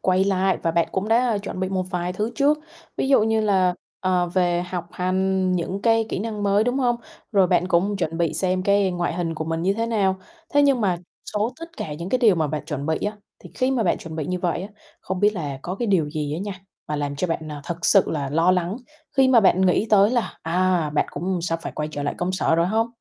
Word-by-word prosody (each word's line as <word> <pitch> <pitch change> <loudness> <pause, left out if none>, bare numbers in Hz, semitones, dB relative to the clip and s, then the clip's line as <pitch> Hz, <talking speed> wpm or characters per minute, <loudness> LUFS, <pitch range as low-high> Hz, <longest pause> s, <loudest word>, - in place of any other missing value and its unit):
quay 185 +1 +2
lại 190 -1 +1
và 165 - +1
bạn 170 0 +1
cũng 195 +2 -2
đã 230 -1 +3
chuẩn 200 -2 -6
bị 185 - 0
một 190 -1 -1
vài 180 -1 -2
thứ 210 +4 -2
trước, 295 +1 +3 0.4
ví - - -1
dụ 270 -5 +5
như 220 0 +2
là, 190 -4 +2 0.3
ờ, 180 -1 +1
về 175 -1 +1
học 180 -1 -5
hành 185 0 0
những 185 +3 -2
cái 225 -1 +3
kỹ - - -2
năng 210 0 -4
mới, 200 +1 +3
đúng 245 +3 0
hông? 240 -2 +2 0.4
Rồi 195 -3 +5
bạn 180 0 +2
cũng 195 +4 +2
chuẩn 165 -3 -2
bị 170 -2 0
xem 185 -1 0
cái 200 0 +3
ngoại 175 -1 -2
hình 170 -2 -2
của 160 0 -4
mình 165 +1 -2
như 190 +3 +2
thế 230 +2 -1
nào. 200 -4 +1 0.4
Thế 290 - +6
nhưng 275 -3 +3
mà 185 -5 +1 0.4
số 210 +4 0
tất 330 0 -10
cả 155 - -5
những 170 +4 -6
cái 255 - +1
điều 225 -6 +5
mà 160 -3 0
bạn 150 0 -4
chuẩn 145 -2 -4
bị 160 -1 0
á, 210 +1 -4 0.2
thì - - -13
khi 255 0 +1
mà 255 -4 +1
bạn 180 - +1
chuẩn 160 -1 -8
bị 155 - -3
như 180 0 -2
vậy 175 -1 -1
á, 195 - -6 0.3
không 185 0 -4
biết 210 - +5
là 145 -6 -4
có 180 - -4
cái 235 +4 -3
điều 175 -8 +2
gì 150 -1 -3
á - - -3
nha, 200 +2 -4 0.4
mà 150 - -1
làm 145 -1 -3
cho 165 - 0
bạn, 160 -2 -3
ờ, 150 -1 -6
thực 170 +1 -5
sự 195 - +5
là 145 -3 -2
lo 165 +4 +3
lắng 180 +2 0 0.4
khi 265 -1 +5
mà 250 -3 +6
bạn 190 -2 +4
nghĩ 185 +4 +2
tới 205 0 +6
là, 240 -3 -1
à, 175 -1 +1
bạn 150 - +1
cũng 180 +5 -2
sắp 165 -1 -1
phải - - -5
quay 150 0 -3
trở 145 - -4
lại - - -2
công 180 +1 -1
sở 185 -3 +1
rồi 170 +1 +2
hông? 220 +4 +1
185 Hz, 265 wpm, -23 LUFS, 170-210 Hz, 0.4 s, Thế